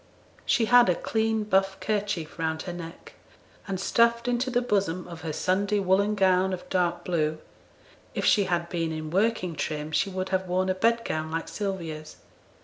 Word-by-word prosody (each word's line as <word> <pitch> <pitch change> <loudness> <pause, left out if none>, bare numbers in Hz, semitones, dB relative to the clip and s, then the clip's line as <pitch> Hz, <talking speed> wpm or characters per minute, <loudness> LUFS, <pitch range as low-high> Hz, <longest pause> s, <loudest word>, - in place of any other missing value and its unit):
She 230 - +3
had 245 -2 +6
a 180 - +3
clean 220 +2 0
buff 195 -2 +1
kerchief 200 -7 -2
round 160 -1 -1
her 175 - -5
neck, 170 -1 -9 0.5
and 195 -2 -3
stuffed 235 +4 +2
into 245 +1 0
the 245 -1 +2
bosom 195 -6 0
of 170 -2 -9
her 160 - -3
Sunday 200 +6 0
woollen 200 +2 +2
gown 190 -1 +3
of 180 - -6
dark 175 -2 0
blue, 155 -3 0 0.8
if - - -1
she 205 -2 +4
had 175 -2 -1
been 165 -2 -2
in 155 -1 -5
working 190 -3 +1
trim 150 +1 -3
she 195 - +1
would 185 0 -3
have 190 0 -1
worn 185 +1 0
a - - +3
bedgown 190 -6 0
like 165 +1 -3
Sylvia's. 165 -7 -5
185 Hz, 175 wpm, -27 LUFS, 165-210 Hz, 0.8 s, had